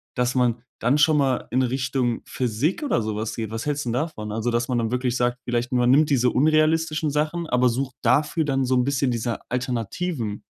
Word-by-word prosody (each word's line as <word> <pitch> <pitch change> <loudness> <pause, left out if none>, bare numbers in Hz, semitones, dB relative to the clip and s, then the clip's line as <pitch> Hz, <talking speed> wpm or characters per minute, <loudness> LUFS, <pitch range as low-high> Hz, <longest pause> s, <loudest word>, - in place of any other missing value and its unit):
Dass 125 +1 0
man 120 -2 +1 0.2
dann 125 +5 +2
schon 150 0 +4
mal 135 -3 0
in 130 +1 +2
Richtung 130 -1 -1
Physik 130 - -1
oder 200 - +1
so 105 -1 -3
was 110 +1 -3
geht. 110 -2 -4
Was 115 +3 -4
hältst 145 -2 -2
'n 120 - -1
davon? 125 -7 -3
Also, 115 +2 -1
dass 120 +2 -1
man 125 - +1
dann 115 0 -1
wirklich 125 -1 0
sagt, 125 0 0
vielleicht: 120 +1 -2
Man 125 0 +3
nimmt 150 +2 +4
diese 125 -3 +3
unrealistischen 155 +2 +2
Sachen, 155 +3 -1
aber 125 -1 +3
sucht 130 +2 -2
dafür 155 +1 +2
dann 135 -2 0
so 130 0 +1
'n 125 0 +2
bisschen 135 -2 +1
diese 115 0 -2
Alternativen. 125 - -3
125 Hz, 210 wpm, -23 LUFS, 120-145 Hz, 0.2 s, schon